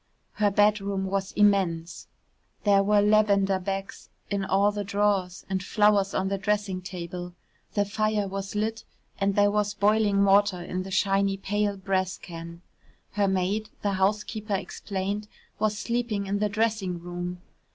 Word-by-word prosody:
Her 210 -1 +2
bedroom 200 -1 +2
was 195 0 -2
immense 190 -5 +1 0.6
there 200 -1 +5
were 205 +1 +4
lavender 200 -2 +3
bags 195 +1 -5 0.2
in 200 -1 0
all 195 +2 +3
the 205 0 -3
drawers, 200 -2 0
and 190 -1 -1
flowers 205 -1 +3
on 190 - 0
the 195 0 -1
dressing 205 -2 -1
table, 175 -1 -7 0.4
the 205 -1 +2
fire 215 0 0
was 195 +1 -5
lit 220 +2 -1 0.4
and 195 -1 +1
there 205 0 +4
was 205 0 0
boiling 205 -1 +3
water 200 -1 +4
in 180 +1 -4
the 190 - -7
shiny 195 0 +1
pale 205 +1 -1
brass 190 -1 -1
can. 170 0 -9 0.5
Her 205 -1 +1
maid, 190 +3 0
the 205 - +1
housekeeper 210 +2 0
explained, 200 +1 -4 0.3
was 215 0 +1
sleeping 235 -4 -1
in 200 +1 -1
the 210 0 +1
dressing 215 -4 0
room. 175 +1 -5
200 Hz, 150 wpm, -26 LUFS, 190-210 Hz, 0.6 s, there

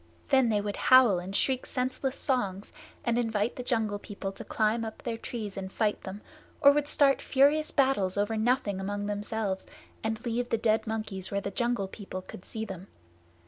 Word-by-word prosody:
Then 265 -3 +4
they 210 -2 +2
would 205 0 -3
howl 250 -8 +6
and 185 +3 -6
shriek 260 +2 +1
senseless 260 +1 -2
songs, 205 -10 -1 0.3
and 235 -1 +2
invite 225 -1 0
the - - -5
Jungle 220 -4 0
People 200 -1 -6
to 195 - -9
climb 220 +1 +1
up 220 -1 -7
their 235 -2 -2
trees 220 -3 -6
and 190 -1 -5
fight 210 0 0
them, 195 +2 -7 0.4
or 280 - +8
would 290 0 +1
start 280 -2 +3
furious 290 +3 +3
battles 235 -10 +2
over 205 +2 +1
nothing 220 -3 +1
among 205 +1 -3
themselves, 205 -1 -2 0.4
and 220 +2 -3
leave 240 +1 -1
the 230 - +2
dead 220 0 +1
monkeys 215 -4 -3
where 200 - -1
the 200 0 -4
Jungle 235 -2 0
People 190 -2 -7
could 180 - -11
see 220 0 -4
them. 190 -2 -8
220 Hz, 185 wpm, -29 LUFS, 200-245 Hz, 0.4 s, or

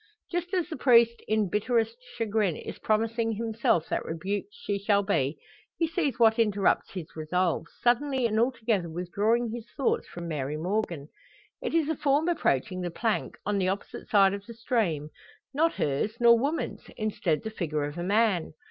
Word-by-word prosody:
Just 350 0 -2
as 355 -3 0
the 320 - -6
priest 235 -2 +5
in 215 -1 +2
bitterest 225 +3 0 0.2
chagrin 215 -6 +1
is - - -8
promising 225 +1 +1
himself 225 -6 0
that - - -1
rebuked 195 +6 -3
she 205 -1 -3
shall 200 0 +2
be 155 -8 0 0.4
he 330 - +1
sees 315 -6 -1
what 225 -1 +4
interrupts 205 -3 +2
his 175 -4 -8
resolves, 165 +2 -1
suddenly 255 +1 +2
and 220 -1 +1
altogether 230 -7 +1
withdrawing 205 +8 0
his 235 0 -7
thoughts 275 - +1
from 170 0 -7
Mary 150 -2 -3
Morgan. 175 -4 -2 0.5
It - - -2
is 325 -3 +3
a 320 - 0
form 290 +3 +2
approaching 185 - 0
the 175 - -2
plank, 220 +6 -2
on 205 -1 0
the 185 - +1
opposite 195 +2 -4
side 195 -2 +5
of 200 0 -5
the 235 - -9
stream; 185 - -1 0.4
not 325 +4 +2
hers, 150 +11 -1
nor 235 -1 +7
woman's; 280 +8 -2
instead 205 -7 -1
the 220 - -4
figure 155 -7 -2
of 145 +1 -4
a - - -2
man! 200 -4 +2
215 Hz, 175 wpm, -28 LUFS, 180-235 Hz, 0.5 s, nor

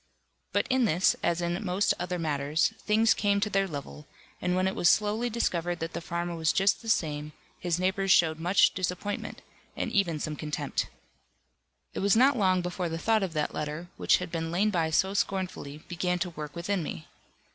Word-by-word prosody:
But - - +1
in 260 -1 +3
this, 180 -2 +3
as 170 0 0
in 175 +4 -2
most 190 +1 +2
other 180 0 -2
matters, 150 0 +1
things 220 +1 +3
came 200 -1 +1
to 210 +1 -1
their 195 0 +2
level, 150 -1 -8 0.3
and 180 0 0
when 185 +1 +2
it 190 - -1
was 175 - +3
slowly 215 +5 +2
discovered 175 -7 -1
that 165 0 -5
the - - -4
farmer 170 +1 -3
was 160 -1 +2
just 195 +1 +2
the 225 - -6
same, 150 -5 0 0.3
his 175 -2 0
neighbours 190 +1 0
showed 160 -3 +4
much 175 +4 +4
disappointment, 185 +2 -4 0.3
and - - -2
even 175 -6 +1
some 150 +1 -3
contempt. 150 -2 -3 1.1
It - - -4
was 200 +1 +3
not 265 +4 +5
long 185 -5 +2
before 180 0 -3
the 165 - -3
thought 220 +5 +2
of 190 -4 -2
that 150 -1 -1
letter, 150 +4 -4
which - - +3
had - - -6
been 165 -1 -2
laid 195 +6 +1
by 165 -4 +1
so 190 +5 +2
scornfully, 185 -7 -3
began 180 +1 -1
to 180 0 -3
work 150 -1 -7
within 185 +2 -1
me. 80 - -6
175 Hz, 195 wpm, -28 LUFS, 165-195 Hz, 1.1 s, not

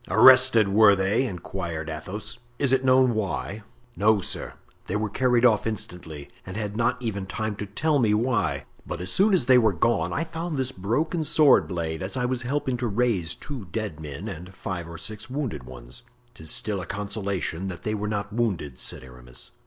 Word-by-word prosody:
"Arrested, 125 -2 +7
were 100 +1 +6
they?" 100 +7 +1
inquired 85 -4 -5
Athos; 100 +9 -6 0.2
"is 140 -2 +1
it 135 0 +3
known 130 -1 +5
why?" 105 0 -3 0.3
"No, 105 +1 +4
sir, - - -3 0.3
they 95 - -2
were 105 -1 -1
carried 125 0 +3
off 110 -2 +4
instantly, 85 -8 -5 0.2
and 95 +2 -7
had 105 -1 -3
not 115 +2 +1
even 100 -6 -3
time 110 +2 -3
to 105 - -5
tell 145 +9 +1
me 110 -4 +3
why; 115 -2 0 0.2
but - - -6
as 90 0 -1
soon 205 +3 +4
as 180 -10 +3
they 130 -1 +7
were 110 -4 +3
gone 115 +7 +1
I 165 - 0
found 165 -1 -4
this 130 -1 0
broken 145 - -1
sword 155 -2 +5
blade, 85 -3 -3
as 95 +7 -2
I 125 - 0
was 125 0 -1
helping 130 0 -1
to 120 0 -1
raise 105 -7 0
two 130 -8 -7
dead 95 -3 -4
men 75 -3 -7
and 90 +3 -8
five 85 -3 -5
or 85 - -8
six 110 +7 -6
wounded 125 - -3
ones." 65 - -10 0.3
"'Tis 80 -8 -8
still 100 +2 0
a 90 - -8
consolation 100 -3 -3
that 90 -2 -7
they 110 - -1
were 105 0 -2
not 100 -1 -3
wounded," 95 - -2
said - - -3
Aramis. 60 -1 -10
105 Hz, 195 wpm, -25 LUFS, 90-125 Hz, 0.3 s, Arrested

